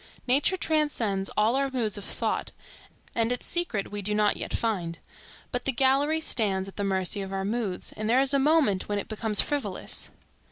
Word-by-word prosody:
Nature 280 +9 +3
transcends 245 - 0
all 215 +4 +3
our 275 0 +1
moods 235 -6 -1
of 205 - -6
thought, - - -2 0.6
and 230 0 +1
its 245 - -2
secret 335 - -1
we 205 0 -4
do 210 +2 +1
not 210 -1 +3
yet - - -5
find. 180 -7 -1 0.5
But 245 -1 -2
the 270 - +2
gallery 275 +5 +2
stands 195 -9 0
at 195 - -11
the 205 - -2
mercy 190 0 0
of 195 0 -5
our 195 0 -2
moods, 210 -3 -2
and 215 0 -4
there 245 +3 +5
is 270 +1 +3
a 275 - +4
moment 275 -11 +3
when 205 - 0
it 205 - -3
becomes 215 -1 +2
frivolous. 290 -1 -3
220 Hz, 195 wpm, -27 LUFS, 200-270 Hz, 0.6 s, there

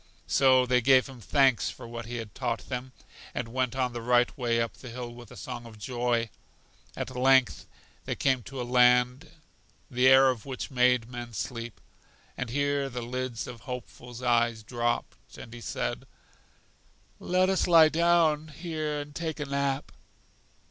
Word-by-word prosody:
So 130 -2 +4
they 125 0 +2
gave 130 +1 +5
him 130 -3 -12
thanks 135 +1 +3
for - - -9
what 115 -1 -7
he 120 - -5
had 115 -3 -6
taught 120 -3 -3
them, 130 0 -4 0.4
and 120 -2 -3
went 130 -1 -1
on 125 -2 -1
the 120 - -5
right 120 +1 +2
way 120 -3 0
up 115 -1 -1
the 125 - -11
hill 120 0 -7
with 120 -1 -12
a - - -12
song 120 -2 -7
of 110 -2 -13
joy. 120 0 -1 0.6
At 130 - -5
length 130 0 +3 0.4
they - - -2
came 130 -2 +1
to 135 -1 -7
a - - -1
land 125 +2 +3 0.6
the 125 +1 +3
air 130 0 +7
of 125 -4 -2
which 135 +1 -6
made 125 -2 +3
men 120 -1 -8
sleep, 115 +2 -5 0.6
and 125 - -4
here 140 +1 0
the 125 -1 -5
lids 125 -1 -4
of 125 -2 -9
Hopeful's 125 -1 -8
eyes 120 -2 +2
dropped, 120 +1 -3
and 115 - -10
he 120 - -9
said: - - -4 1.1
Let 185 +1 +2
us 190 0 +1
lie 165 -3 +7
down 165 -2 +3
here 155 -1 -4
and 145 0 -10
take 160 0 -4
a 150 - -2
nap. 140 0 -2
125 Hz, 170 wpm, -28 LUFS, 120-135 Hz, 1.1 s, air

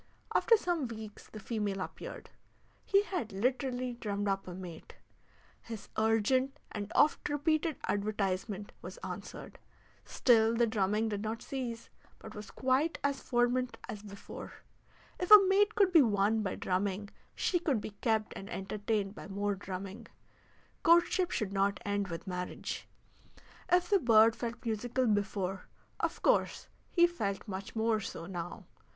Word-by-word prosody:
After 460 - +5
some 345 -9 -1
weeks 220 -2 -9
the 215 - -9
female 210 -2 -2
appeared; - - -7 0.5
he 395 +1 +4
had 355 - -3
literally 250 +4 -1
drummed 205 -3 -3
up 195 -1 -1
a 180 - -6
mate; 180 -3 -9 0.7
his 225 -3 -8
urgent 225 +5 +2
and 205 0 -5
oft 300 - +3
repeated 310 +1 +1
advertisement 205 0 -1
was - - -8
answered. - - -7 0.4
Still 230 -2 +4
the 235 +1 +4
drumming 215 0 +1
did 205 -1 -2
not 220 +1 -4
cease, 240 -4 -5 0.3
but - - -11
was 210 0 -8
quite 265 +5 +1
as 280 -1 0
fervent 245 +1 +1
as 215 -4 -6
before. 200 -1 -9 0.7
If 360 - -2
a 420 -2 +11
mate 410 +3 +4
could 400 -4 +4
be 335 -3 +8
won 215 -2 +2
by 195 -3 -2
drumming 195 +2 -1 0.3
she 355 - +1
could 290 -9 +1
be 210 - -6
kept 220 -2 +1
and 195 - -8
entertained 205 0 -2
by - - -9
more 200 +1 -1
drumming; 195 +3 -7 0.7
courtship 345 +2 +4
should 200 -3 -2
not 200 0 +1
end 205 -1 0
with 165 -2 -6
marriage. 180 -1 -4 0.8
If 355 +1 +3
the 400 - +6
bird 225 -4 +6
felt 235 0 -5
musical 240 +3 0
before, 200 -3 -1 0.3
of - - -2
course - - +2 0.2
he 345 -1 +5
felt 215 - -2
much 195 +1 -6
more 220 0 +2
so 165 -5 -6
now. 175 -1 -6
220 Hz, 145 wpm, -32 LUFS, 200-260 Hz, 0.8 s, a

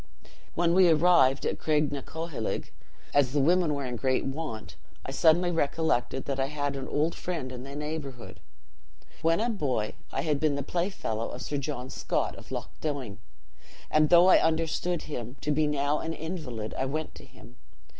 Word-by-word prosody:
"When 170 0 +2
we 185 -1 +6
arrived 155 -4 +5
at - - -1
Craignacoheilg, 150 -2 -2 0.4
as 140 -3 +3
the 145 - +2
women 165 +1 +3
were 140 -1 -3
in 125 -1 -4
great 130 +1 +1
want, 135 -6 -5 0.3
I - - -4
suddenly 170 +5 +4
recollected 140 -5 0
that 135 -1 -2
I 135 - +2
had 145 -1 -2
an 135 -1 -5
old 155 +3 +1
friend 160 -8 -4
in 125 -1 -7
the 135 +2 -8
neighborhood. 145 -5 -6 0.8
When 165 +3 +3
a 230 - +1
boy, 135 - -1 0.2
I - - -1
had 150 -3 +1
been 150 -2 +2
the 140 - -2
playfellow 170 - -2
of 125 - -7
Sir 145 - -2
John 130 -2 -4
Scott - - -1
of - - -13
Loch - - -4
Doine; 135 -9 -3 0.7
and 155 0 +4
though 175 0 +8
I 185 - +7
understood 165 +1 0
him 125 -4 -6
to 150 - -1
be 150 +1 +2
now 145 0 +1
an 165 - -3
invalid, 150 -11 -5
I 130 - +1
went 155 +3 -3
to - - -12
him. 125 -1 -16
145 Hz, 175 wpm, -28 LUFS, 130-160 Hz, 0.8 s, though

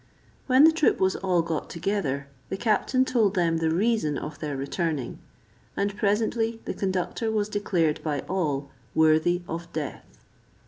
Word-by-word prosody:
When 260 +1 +6
the 320 - +8
troop 320 -2 +2
was 190 0 +2
all 180 -3 +1
got 165 -2 -3
together, 165 -6 -2 0.2
the 195 - -3
captain 240 +4 +2
told 220 -6 +2
them 170 -3 +2
the 160 0 +1
reason 180 -4 +1
of 155 - -6
their 145 -3 -3
returning; 140 -1 -2 0.6
and 200 0 0
presently 225 +2 0
the - - -3
conductor 190 +4 -1
was 210 -2 0
declared 180 -7 0
by 145 -4 -2
all 145 -7 -2 0.2
worthy 160 +3 +3
of 170 +1 -6
death. 150 -3 -6
180 Hz, 150 wpm, -26 LUFS, 155-210 Hz, 0.6 s, the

